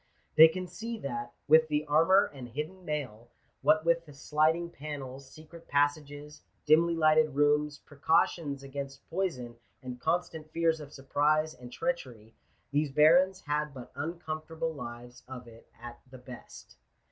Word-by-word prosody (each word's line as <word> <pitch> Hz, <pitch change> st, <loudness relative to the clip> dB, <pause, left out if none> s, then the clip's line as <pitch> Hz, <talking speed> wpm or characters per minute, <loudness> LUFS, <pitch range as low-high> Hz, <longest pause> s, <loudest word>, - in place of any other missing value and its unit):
They 160 Hz, +1 st, +10 dB
can 185 Hz, +3 st, -5 dB
see 225 Hz, +7 st, -6 dB
that* 120 Hz, -3 st, -5 dB
what 160 Hz, +1 st, +6 dB
with 150 Hz, 0 st, 0 dB
armour 165 Hz, +7 st, +4 dB
and 130 Hz, -3 st, -9 dB
hidden 155 Hz, +9 st, -6 dB
mail, 125 Hz, -8 st, -5 dB, 0.3 s
what 155 Hz, +3 st, +3 dB
with 170 Hz, 0 st, +3 dB
sliding 160 Hz, +4 st, +1 dB
panels, 140 Hz, -3 st, -8 dB
secret 160 Hz, +3 st, -14 dB
passages, 145 Hz, +1 st, -1 dB, 0.2 s
dimly 165 Hz, +3 st, +4 dB
lighted 155 Hz, -2 st, +3 dB
rooms, 145 Hz, 0 st, +2 dB
precautions 145 Hz, -1 st, 0 dB
against 140 Hz, 0 st, -7 dB
poi 190 Hz, +3 st, +1 dB
son, 120 Hz, -6 st, -10 dB, 0.3 s
and 125 Hz, -1 st, -7 dB
constant 165 Hz, -2 st, -2 dB
fears 165 Hz, -1 st, +1 dB
of 145 Hz, -2 st, -10 dB
surprise 150 Hz, +3 st, 0 dB
and 125 Hz, -1 st, -12 dB
treachery, 125 Hz, -, -4 dB, 0.4 s
these 145 Hz, +1 st, +1 dB
barons 175 Hz, +7 st, +4 dB
had 150 Hz, -1 st, -2 dB
but 125 Hz, -2 st, -10 dB
uncomfortable 160 Hz, +1 st, -4 dB
lives 120 Hz, -3 st, -9 dB
of 125 Hz, -2 st, -9 dB
it 115 Hz, 0 st, -16 dB
at 120 Hz, 0 st, -10 dB
the 130 Hz, -, -11 dB
best. 125 Hz, -1 st, -13 dB
150 Hz, 145 wpm, -30 LUFS, 135-160 Hz, 0.4 s, They